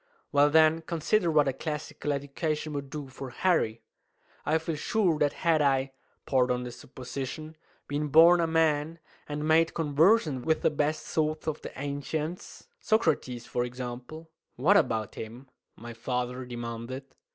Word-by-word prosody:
"Well, 145 +1 +5
then, 160 +1 +5
consider 170 +4 0
what 150 -3 +4
a 135 - +1
classical 150 0 -4
education 150 +2 -2
would 140 -1 -4
do 145 -1 -6
for 130 0 -8
Harry! 120 -6 0 0.6
I 155 +2 +3
feel 160 0 -3
sure 170 0 +1
that 145 -1 +2
had 160 -2 +4
I 135 -1 +2 0.3
pardon 125 -2 +1
the 125 - -6
supposition 135 +5 -7 0.3
been 145 +1 -2
born 165 +4 +7
a 165 - +1
man, 160 0 +1 0.3
and 150 +1 -3
made 160 +1 +3
conversant 155 - +3
with 160 +2 +1
the - - +4
best 150 +1 -1
thoughts 155 0 -1
of 155 -1 -2
the - - -9
ancients 150 - -4
Socrates, 155 - 0
for 120 - -1
example 125 +6 -7
" - - -63
"What 165 +11 +4
about 110 - +1
him?" 120 +4 -9 0.2
my 120 +1 -9
father 125 +2 -3
demanded. 120 +2 -6
145 Hz, 150 wpm, -28 LUFS, 130-160 Hz, 0.6 s, born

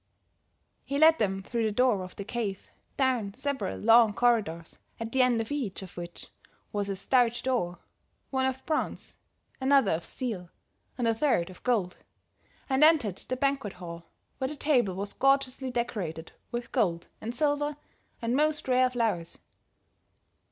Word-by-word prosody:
"He 280 - -3
led 320 +2 +6
them 195 -3 0
through 235 +3 -2
the 215 - +1
door 240 -2 +2
of 185 - -10
the 200 - -5
cave, 210 -3 -4 0.3
down 245 -7 +1
several 280 -1 -2
long 225 0 +6
corridors 210 -9 +1 0.2
at 230 0 -4
the 265 - +3
end 250 -2 +3
of 225 +3 -3
each 240 -10 -3
of 185 - -11
which 175 0 -8 0.4
was 205 -1 -1
a 195 - -1
stout 240 +4 +2
door, 225 -10 0 0.5
one 265 -1 +1
of 265 0 -4
bronze, 310 -1 -2 0.5
another 270 -5 +4
of 160 +1 -1
steel 210 -9 -5 0.5
and 240 -2 0
a 230 - +3
third 220 - +1
of 185 - -15
gold, 210 -8 0 0.7
and 265 +2 +3
entered 285 - +5
the 255 - -2
banquet 275 -6 0
hall, 170 -2 -9 0.3
where 260 - 0
the 300 - -5
table 250 -11 +2
was 200 +2 -4
gorgeously 270 -1 +2
decorated 205 -10 -3 0.2
with 240 0 -4
gold 175 -9 0
and 230 +2 -5
silver 290 0 0 0.5
and 230 +2 +1
most 300 +1 +1
rare 255 0 +4
flowers. 220 -9 -1
235 Hz, 160 wpm, -28 LUFS, 195-265 Hz, 0.7 s, led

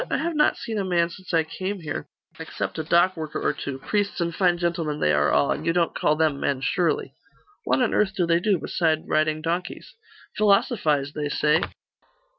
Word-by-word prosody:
I - - +1
have 335 -1 -2
not 300 0 +3
seen 220 -2 -4
a - - 0
man 175 -2 +1
since 185 +1 -10
I 165 -2 +3
came 185 +4 -5
here, 145 - -5 0.3
except - - -5
a - - -1
dock 175 +3 +3
worker 155 -2 -5
or - - 0
two 140 -2 -5
priests 205 +8 -2
and 170 -1 -1
fine 175 -1 +2
gentlemen 170 -3 -2
they 75 - +2
are 75 0 +3
all 140 - +3
and 150 - -2
you 165 +1 +1
don't 170 -1 +1
call 150 - +1
them 155 -3 +1
men, 135 -2 -1
surely?' 170 +6 0 0.5
'What 255 - +2
on 245 - 0
earth 195 -2 +1
do 180 - +1
they 170 0 +3
do, 195 +1 +2
beside 160 -1 -1
riding 155 0 +1
donkeys?' 175 - -4 0.4
'Philosophise, 195 - +2
they 150 -1 -3
say. 150 +3 +2
170 Hz, 205 wpm, -24 LUFS, 155-185 Hz, 0.5 s, not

